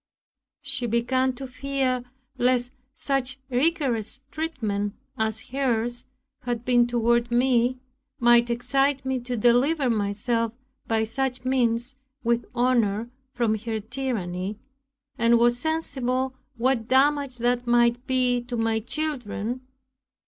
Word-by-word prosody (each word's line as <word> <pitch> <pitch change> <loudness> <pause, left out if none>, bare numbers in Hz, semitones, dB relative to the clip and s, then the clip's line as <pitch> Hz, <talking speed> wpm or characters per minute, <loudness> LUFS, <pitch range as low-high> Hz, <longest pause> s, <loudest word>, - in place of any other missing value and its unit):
She 245 - -2
began 255 +3 +1
to 265 +2 -7
fear 260 -1 -1 0.3
lest 245 -1 +1 0.2
such 270 -2 -2
rigorous 265 -3 0
treatment, 215 -11 -2 0.2
as 220 0 -1
hers 240 -3 -1 0.4
had 240 -1 -3
been 245 -1 +4
toward 235 0 +2
me, 245 0 +2 0.4
might 240 0 +5
excite 270 +3 +1
me 265 -1 0
to 245 0 -4
deliver 250 +4 +3
myself 225 +2 0 0.3
by 220 -1 +2
such 255 +2 -2
means, 250 0 +1 0.3
with 235 0 +1
honor, 235 -2 +1 0.2
from 235 -3 +2
her 225 0 -3
tyranny, 210 -5 -3 0.6
and 235 0 +5
was 240 +1 +3
sensible 265 -4 -1 0.2
what 235 -1 +1
damage 275 0 +3
that 245 +1 0
might 240 0 +3
be 250 -1 +2
to 245 -1 -4
my 225 -1 +1
children. 245 -3 -3
245 Hz, 115 wpm, -25 LUFS, 230-260 Hz, 0.6 s, might